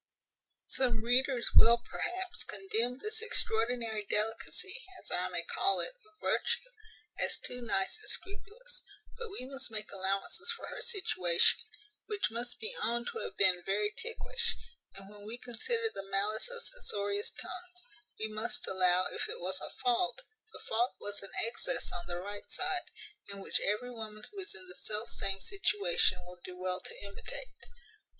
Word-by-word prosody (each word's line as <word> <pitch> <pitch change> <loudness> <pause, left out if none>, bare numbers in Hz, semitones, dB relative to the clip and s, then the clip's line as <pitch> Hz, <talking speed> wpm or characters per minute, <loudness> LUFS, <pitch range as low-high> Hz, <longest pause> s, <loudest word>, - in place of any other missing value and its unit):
Some 240 -4 +1
readers 250 +1 +3
will, 235 +1 +9
perhaps, 365 0 -1
condemn 220 +5 +1
this 430 +8 -1
extraordinary 230 - +1
delicacy, 230 - +1 0.2
as - - -9
I - - +3
may - - -2
call 390 +1 +2
it, - - +3
of 430 -4 -22
virtue, - - 0 0.5
as - - +2
too 250 0 -5
nice 200 - 0
and 425 - -6
scrupulous; 470 +5 -3 0.3
but 475 -1 -6
we 395 -11 -5
must 270 0 0
make 215 -2 -4
allowances 195 - 0
for - - -8
her - - -6
situation, 185 - +3 0.5
which 415 - 0
must 240 +2 +6
be 450 +3 -1
owned 235 +1 0
to 455 - -4
have - - -6
been 185 -3 +5
very 210 +2 +1
ticklish; 465 +1 -2 0.4
and, 195 0 -10
when 205 0 -12
we 230 +2 -5
consider 450 - -1
the 195 0 -7
malice 205 - +2
of 485 -1 -6
censorious 205 - 0
tongues, 360 +2 -6 0.3
we 215 - 0
must 215 +2 -2
allow, 185 -1 +4
if - - -2
it - - -4
was 185 +2 +1
a - - -2
fault, 310 - +1 0.3
the - - -9
fault 235 +3 +1
was 205 0 -2
an 195 - -4
excess 230 +1 0
on 175 - -5
the 175 0 -3
right 205 +3 -7
side, 370 -1 +1 0.4
and 200 0 -7
which - - 0
every 215 +5 0
woman 215 -2 -8
who 405 - -8
is 405 +2 -6
in 370 - -11
the 375 - -9
self 215 - -2
same 195 0 0
situation 415 - +2
will 180 0 -11
do 180 0 -8
well 185 0 -1
to - - -2
imitate. - - -6
235 Hz, 170 wpm, -33 LUFS, -, 0.5 s, will